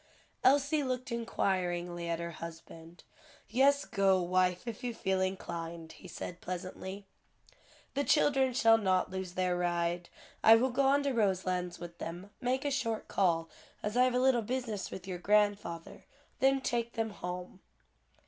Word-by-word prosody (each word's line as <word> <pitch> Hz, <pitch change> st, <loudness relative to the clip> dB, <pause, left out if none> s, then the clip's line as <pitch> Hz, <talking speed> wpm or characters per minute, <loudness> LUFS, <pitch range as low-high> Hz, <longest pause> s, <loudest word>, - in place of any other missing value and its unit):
Elsie 285 Hz, +3 st, +4 dB
looked 255 Hz, -2 st, -3 dB
inquiringly 175 Hz, -6 st, -1 dB
at 165 Hz, -, 0 dB
her 170 Hz, 0 st, -4 dB
husband. 165 Hz, +1 st, -10 dB, 0.4 s
"Yes, 280 Hz, +2 st, +3 dB
go, 195 Hz, -1 st, +3 dB
wife, 180 Hz, 0 st, +1 dB
if 230 Hz, -1 st, -6 dB
you 240 Hz, -2 st, -3 dB
feel 190 Hz, -3 st, 0 dB
inclined," 170 Hz, -3 st, -4 dB
he -, -, -13 dB
said 175 Hz, 0 st, -7 dB
pleasantly. 185 Hz, +2 st, -6 dB, 0.9 s
"The 280 Hz, -, 0 dB
children 270 Hz, -4 st, +3 dB
shall 225 Hz, -2 st, +5 dB
not 185 Hz, -3 st, +1 dB
lose 190 Hz, -1 st, -4 dB
their 185 Hz, -1 st, 0 dB
ride. 175 Hz, 0 st, -1 dB, 0.3 s
I 225 Hz, -, +9 dB
will 250 Hz, +3 st, +2 dB
go 270 Hz, +2 st, +2 dB
on 280 Hz, +1 st, +3 dB
to 280 Hz, -1 st, 0 dB
Roselands 185 Hz, -5 st, 0 dB
with 170 Hz, 0 st, -9 dB
them, 175 Hz, +5 st, -6 dB
make 255 Hz, +3 st, 0 dB
a 285 Hz, -, +1 dB
short 230 Hz, -5 st, -1 dB
call, 165 Hz, -4 st, +1 dB, 0.4 s
as 210 Hz, +2 st, -2 dB
I 250 Hz, +1 st, +5 dB
have 255 Hz, -1 st, +1 dB
a -, -, +3 dB
little 255 Hz, -2 st, +4 dB
business 225 Hz, -3 st, -3 dB
with 190 Hz, -, -8 dB
your 180 Hz, -2 st, -4 dB
grandfather, 205 Hz, -4 st, 0 dB, 0.3 s
then 270 Hz, 0 st, +3 dB
take 235 Hz, -2 st, -1 dB
them 225 Hz, -1 st, -2 dB
home." 180 Hz, 0 st, -6 dB
195 Hz, 160 wpm, -32 LUFS, 175-245 Hz, 0.9 s, I